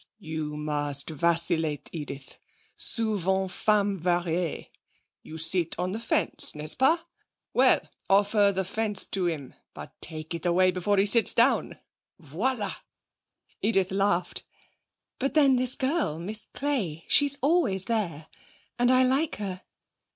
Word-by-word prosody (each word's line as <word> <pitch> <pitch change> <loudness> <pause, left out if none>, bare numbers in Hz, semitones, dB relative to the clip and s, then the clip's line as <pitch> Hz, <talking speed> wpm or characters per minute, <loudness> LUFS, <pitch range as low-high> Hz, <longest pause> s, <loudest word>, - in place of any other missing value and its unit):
You 155 -5 -5
must 145 -1 0
vacillate, 165 -1 0
Edith. 140 -4 -7 0.4
Souvent 190 -4 0
femme 205 -1 +1
varie. 175 -1 -1 0.5
You 160 - -10
sit 165 +1 +1
on 180 +1 -2
the 215 - -4
fence, 230 - +1
n'est 150 +1 -3
ce - - 0
pas? 315 +6 +3 0.5
Well, - - +4 0.2
offer 205 +1 +4
the 190 -1 -2
fence 210 0 -2
to 190 -2 -2
him. 150 -6 -4 0.2
But, - - -10
take 155 0 -6
it 170 - -5
away 185 +1 +3
before 185 +3 0
he 195 - +4
sits 225 +2 +3
down. - - +2 0.4
Voilà!' 200 - -3 0.8
Edith 195 -3 +1
laughed. 195 -2 0 0.8
'But 275 +3 -2
then 275 -4 +5
this 255 0 +2
girl, 270 - -1
Miss 205 +6 -6
Clay, 210 - -3
she's 285 -1 +4
always 265 - +2
there. 185 -10 -2 0.5
And 245 0 +3
I 255 0 +5
like 270 +5 +1
her.' 190 -3 -5
190 Hz, 135 wpm, -27 LUFS, 165-225 Hz, 0.8 s, then